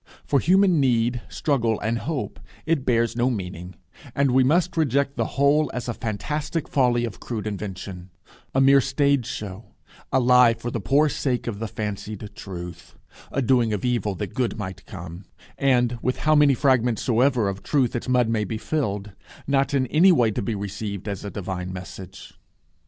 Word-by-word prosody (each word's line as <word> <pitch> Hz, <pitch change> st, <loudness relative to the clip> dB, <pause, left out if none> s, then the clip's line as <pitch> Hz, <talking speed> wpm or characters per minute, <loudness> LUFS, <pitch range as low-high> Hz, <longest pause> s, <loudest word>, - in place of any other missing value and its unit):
For 140 Hz, -, +2 dB
human 185 Hz, +2 st, +4 dB
need, 120 Hz, -2 st, +2 dB
struggle, 120 Hz, -9 st, 0 dB
and 115 Hz, +2 st, -1 dB
hope, 145 Hz, 0 st, -4 dB, 0.3 s
it 160 Hz, -4 st, 0 dB
bears 115 Hz, -2 st, +2 dB
no 120 Hz, +1 st, +2 dB
meaning; 90 Hz, -5 st, -5 dB, 0.4 s
and 140 Hz, -2 st, +2 dB
we 130 Hz, +1 st, +4 dB
must 170 Hz, +6 st, +2 dB
reject 140 Hz, -3 st, +1 dB
the -, -, 0 dB
whole 145 Hz, +2 st, +3 dB
as 125 Hz, -, -4 dB
a 120 Hz, -, -1 dB
fantastic 140 Hz, -, -3 dB
folly 120 Hz, -3 st, +2 dB
of 105 Hz, -6 st, -7 dB
crude 110 Hz, -4 st, -5 dB
invention; 95 Hz, -3 st, -6 dB, 0.5 s
a -, -, +4 dB
mere 135 Hz, +1 st, +6 dB
stage 140 Hz, -1 st, +1 dB
show; 105 Hz, +1 st, -7 dB, 0.4 s
a 130 Hz, -, +3 dB
lie 125 Hz, -2 st, +5 dB
for 115 Hz, +1 st, -5 dB
the 115 Hz, -, -2 dB
poor 140 Hz, +10 st, +3 dB
sake 130 Hz, -3 st, -1 dB
of 105 Hz, -4 st, -4 dB
the 115 Hz, -, -3 dB
fancied 105 Hz, 0 st, -5 dB
truth; 90 Hz, -4 st, -9 dB, 0.4 s
a 140 Hz, -, 0 dB
doing 120 Hz, -3 st, +2 dB
of 105 Hz, -, -2 dB
evil 115 Hz, -5 st, 0 dB
that 100 Hz, -1 st, -5 dB
good 125 Hz, -3 st, -1 dB
might 95 Hz, -3 st, -7 dB
come; 85 Hz, 0 st, -9 dB, 0.3 s
and, 125 Hz, -3 st, +2 dB
with 125 Hz, -, -1 dB
how 155 Hz, -, +5 dB
many 145 Hz, -2 st, +5 dB
fragments 125 Hz, -3 st, +2 dB
soever 125 Hz, -2 st, +2 dB
of 100 Hz, 0 st, -4 dB
truth 130 Hz, -6 st, +1 dB
its 120 Hz, -, -3 dB
mud 125 Hz, -2 st, +3 dB
may 110 Hz, -1 st, 0 dB
be 110 Hz, +2 st, -4 dB
filled, 105 Hz, -7 st, -2 dB, 0.3 s
not 140 Hz, 0 st, +1 dB
in 130 Hz, -2 st, +2 dB
any 165 Hz, +9 st, +5 dB
way 120 Hz, -10 st, +3 dB
to 120 Hz, -, -2 dB
be 110 Hz, +2 st, -2 dB
received 100 Hz, 0 st, -5 dB
as 100 Hz, -3 st, -4 dB
a 100 Hz, -, -4 dB
divine 95 Hz, -2 st, -5 dB
message. 90 Hz, 0 st, -9 dB
120 Hz, 180 wpm, -24 LUFS, 105-135 Hz, 0.5 s, mere